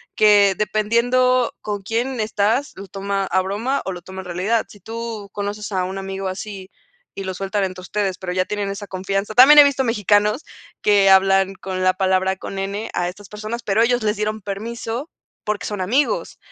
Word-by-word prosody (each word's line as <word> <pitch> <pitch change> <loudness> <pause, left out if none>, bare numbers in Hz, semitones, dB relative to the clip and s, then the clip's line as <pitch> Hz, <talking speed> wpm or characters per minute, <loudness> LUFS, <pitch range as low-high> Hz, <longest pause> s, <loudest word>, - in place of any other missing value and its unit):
que 205 -2 +5
dependiendo 235 +4 +2
con 205 -1 -4
quién 240 +4 -2
estás, 220 +6 0
lo 195 +1 -8
toma 195 +1 -2
a 185 +1 +2
broma 220 +9 -2
o 190 - -3
lo 175 - -8
toma 190 +1 -9
en - - -13
realidad. 185 +6 0
Si 205 - -15
tú 225 -3 -6
conoces 205 +1 -4
a 185 -1 0
un 190 +1 -5
amigo 195 0 -4
así 190 0 -7 0.4
y 195 - -5
lo 190 - -3
sueltan 195 +2 -2
entre 185 -1 -6
ustedes, 195 -1 -2
pero 180 -2 -4
ya 185 0 +2
tienen 205 -1 -3
esa 200 +1 -6
confianza 195 +3 -3
también 290 +4 +9
he - - +12
visto 275 -2 +1
mexicanos 210 - +2 0.4
que 200 -2 +4
hablan 195 0 +4
con 185 -1 -4
la 185 - +4
palabra 190 0 +1
con 195 0 -6
"n" 200 +3 -3
a 175 - 0
estas 195 +2 -12
personas, 215 +3 -6
pero 210 +2 +2
ellos 245 0 +1
les 210 0 0
dieron 215 0 -2
permiso 225 - -5 0.3
porque 210 -1 -2
son 205 -3 -4
amigos 280 - 0
205 Hz, 195 wpm, -21 LUFS, 190-225 Hz, 0.4 s, he